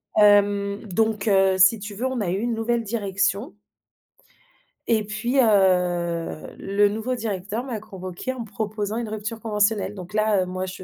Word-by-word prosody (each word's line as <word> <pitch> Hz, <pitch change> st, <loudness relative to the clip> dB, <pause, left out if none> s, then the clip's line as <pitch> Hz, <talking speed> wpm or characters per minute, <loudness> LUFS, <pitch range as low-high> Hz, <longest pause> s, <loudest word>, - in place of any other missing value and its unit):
hem, 205 Hz, -1 st, +4 dB
donc, 220 Hz, +1 st, 0 dB
heu, 195 Hz, -2 st, +4 dB
si 190 Hz, +4 st, +5 dB
tu 205 Hz, 0 st, -7 dB
veux 240 Hz, -, -3 dB
on 260 Hz, -3 st, -1 dB
a 190 Hz, -, -1 dB
eu 190 Hz, +3 st, -1 dB
une 235 Hz, +1 st, -1 dB
nouvelle 230 Hz, +1 st, 0 dB
direction 200 Hz, -1 st, -1 dB, 1.3 s
et 220 Hz, -2 st, +2 dB
puis, 215 Hz, +6 st, -2 dB
heu, 180 Hz, -7 st, +1 dB
le 205 Hz, +1 st, +2 dB
nouveau 225 Hz, +5 st, -2 dB
directeur 215 Hz, 0 st, -3 dB
m'a 245 Hz, -5 st, -4 dB
convoquée 185 Hz, +3 st, -6 dB
en 255 Hz, -, -6 dB
me 230 Hz, -, -5 dB
proposant 215 Hz, 0 st, -3 dB
une 235 Hz, -1 st, -3 dB
rupture 215 Hz, +1 st, -5 dB
conventionnelle. 210 Hz, -2 st, 0 dB
Donc 180 Hz, 0 st, -9 dB
là, 215 Hz, -2 st, +2 dB
heu, 185 Hz, -, -1 dB
moi 185 Hz, +1 st, -4 dB
je 185 Hz, 0 st, -8 dB
205 Hz, 170 wpm, -24 LUFS, 195-225 Hz, 1.3 s, si